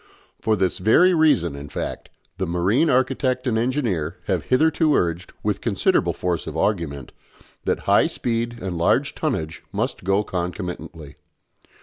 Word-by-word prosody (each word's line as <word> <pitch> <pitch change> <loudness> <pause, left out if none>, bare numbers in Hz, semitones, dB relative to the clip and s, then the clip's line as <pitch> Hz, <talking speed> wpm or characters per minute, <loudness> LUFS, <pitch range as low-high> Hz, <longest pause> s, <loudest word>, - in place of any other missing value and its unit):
For 110 - +2
this 95 -2 0
very 170 - +5
reason, 150 - +3
in 70 0 -8
fact, - - -5 0.3
the 95 - -1
marine 95 - +2
architect 130 0 +1
and 120 -4 +1
engineer 115 - -1
have - - -1
hitherto 155 +3 +3
urged, 85 +1 -1
with - - -1
considerable - - +1
force 90 -3 -2
of 80 0 -5
argument, 80 -10 -1 0.5
that - - 0
high - - +4
speed 120 0 -2
and 95 -2 -3
large 85 - +2
tonnage 80 +1 -3
must - - -2
go 95 +3 +2
concomitantly. 85 -5 -5
95 Hz, 140 wpm, -23 LUFS, 85-125 Hz, 0.5 s, very